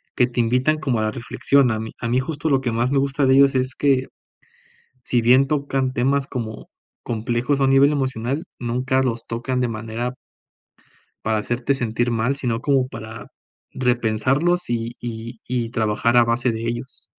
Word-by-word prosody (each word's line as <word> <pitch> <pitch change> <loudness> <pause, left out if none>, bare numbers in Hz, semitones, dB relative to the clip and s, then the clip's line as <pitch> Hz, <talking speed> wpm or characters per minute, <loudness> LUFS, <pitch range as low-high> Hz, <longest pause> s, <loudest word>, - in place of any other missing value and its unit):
que 125 - +3
te 125 -1 -4
invitan 125 +6 +2
como 130 -7 0
a - - 0
la 110 - 0
reflexión. 125 +2 +1
A 110 - -1
mí 110 0 -6
a - - -1
mí 125 +2 +2
justo 150 +3 -3
lo 135 -2 +3
que 125 -3 -1
más 120 +3 0
me 140 - +2
gusta 140 +1 0
de 130 0 +5
ellos 140 0 +5
es 130 0 +1
que, 135 -2 +2 1.0
si 120 0 +1
bien 130 +4 +5
tocan 135 -3 -1
temas 135 +2 +1
como 115 -5 -6 0.3
complejos 120 +4 -1
a - - +4
nivel 135 +2 +5
emocional, 135 +2 -2
nunca 125 +2 0
los 115 -3 -2
tocan 120 +2 -2
de 125 - +1
manera 115 +2 -4 1.1
para 110 0 +1
hacerte 120 +5 -1
sentir 120 -1 -1
mal, 120 +4 0
sino 120 -4 -1
como 135 -1 +1
para 110 -2 -9 0.5
repensarlos, 130 +7 +1
y 115 0 -2
y 115 0 -7
y 120 -2 -2
trabajar 115 +1 +1
a 120 - +7
base 120 +2 +1
de 110 0 -5
ellos. 120 +2 -5
125 Hz, 180 wpm, -22 LUFS, 115-135 Hz, 1.1 s, a